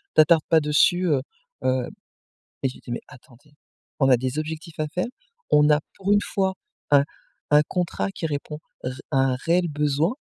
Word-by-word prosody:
t'attarde 155 Hz, 0 st, +6 dB
pas 165 Hz, -, +6 dB
dessus 160 Hz, +4 st, +3 dB
heu, 140 Hz, -5 st, +2 dB, 0.4 s
heu». 130 Hz, -1 st, +1 dB, 0.8 s
Et 135 Hz, -, +2 dB
je 130 Hz, -, -8 dB
lui -, -, -15 dB
dis: -, -, -11 dB
«Mais -, -, -4 dB
attendez, 130 Hz, +3 st, -18 dB, 0.5 s
on 135 Hz, -, +4 dB
a 125 Hz, -, +7 dB
des 130 Hz, +4 st, -3 dB
objectifs 160 Hz, +1 st, -5 dB
à 155 Hz, -, +1 dB
faire, 180 Hz, +4 st, -2 dB, 0.4 s
on 150 Hz, 0 st, +5 dB
a 150 Hz, 0 st, +4 dB, 0.2 s
pour 195 Hz, +1 st, 0 dB
une 205 Hz, -, +5 dB
fois 190 Hz, -2 st, -1 dB, 0.4 s
un 140 Hz, -1 st, +6 dB, 0.5 s
un 150 Hz, 0 st, +6 dB
contrat 170 Hz, -, -1 dB
qui 160 Hz, -, -3 dB
répond 150 Hz, 0 st, -4 dB, 0.2 s
ré 125 Hz, -, -3 dB, 0.2 s
à 135 Hz, -, +2 dB
un 135 Hz, -1 st, +2 dB
réel 170 Hz, +6 st, +1 dB
besoin» 150 Hz, -, 0 dB
150 Hz, 185 wpm, -24 LUFS, 135-165 Hz, 0.8 s, a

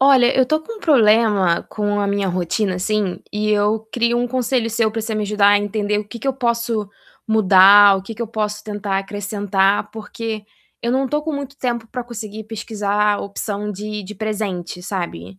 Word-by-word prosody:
Olha, 265 Hz, -2 st, +5 dB
eu 260 Hz, -, +5 dB
tô 310 Hz, +5 st, 0 dB
com 460 Hz, +8 st, -8 dB
um -, -, -22 dB
problema 215 Hz, -, +3 dB
com 205 Hz, -1 st, -1 dB
a 200 Hz, -, 0 dB
minha 200 Hz, 0 st, 0 dB
rotina, 185 Hz, +2 st, -1 dB
assim, 195 Hz, 0 st, -1 dB
e 210 Hz, 0 st, -1 dB
eu 210 Hz, +1 st, +2 dB
queria 235 Hz, 0 st, +1 dB
um 245 Hz, 0 st, +1 dB
conselho 245 Hz, -1 st, 0 dB
seu 225 Hz, -1 st, +1 dB
pra 225 Hz, +1 st, -3 dB
você 220 Hz, 0 st, -3 dB
me 215 Hz, -, -1 dB
ajudar 205 Hz, 0 st, +3 dB
a 205 Hz, -, +5 dB
entender 205 Hz, 0 st, -1 dB
o 210 Hz, -, -5 dB
que 235 Hz, -, -8 dB
que 230 Hz, -, -7 dB
eu 270 Hz, -, +2 dB
posso 235 Hz, -4 st, -1 dB, 0.4 s
mudar, 200 Hz, -1 st, +7 dB
o 190 Hz, -, -5 dB
que 195 Hz, -, -8 dB
que 225 Hz, -, -12 dB
eu 235 Hz, -, -1 dB
posso 210 Hz, -1 st, -3 dB
tentar 205 Hz, -2 st, -2 dB
acrescentar, 200 Hz, 0 st, 0 dB
porque 220 Hz, 0 st, -6 dB, 0.4 s
eu 235 Hz, -, 0 dB
não 265 Hz, +2 st, +1 dB
tô 295 Hz, +3 st, -1 dB
com 315 Hz, +1 st, -3 dB
muito 280 Hz, -1 st, -5 dB
tempo 235 Hz, -3 st, -2 dB
pra 250 Hz, +2 st, -5 dB
conseguir 220 Hz, -3 st, -7 dB
pesquisar 210 Hz, -1 st, -1 dB
a -, -, -4 dB
opção 205 Hz, +1 st, -4 dB
de 210 Hz, +1 st, -5 dB
de 205 Hz, +3 st, -9 dB
presente, 200 Hz, -5 st, -4 dB
sabe, 95 Hz, -, -5 dB
210 Hz, 205 wpm, -20 LUFS, 200-235 Hz, 0.4 s, mudar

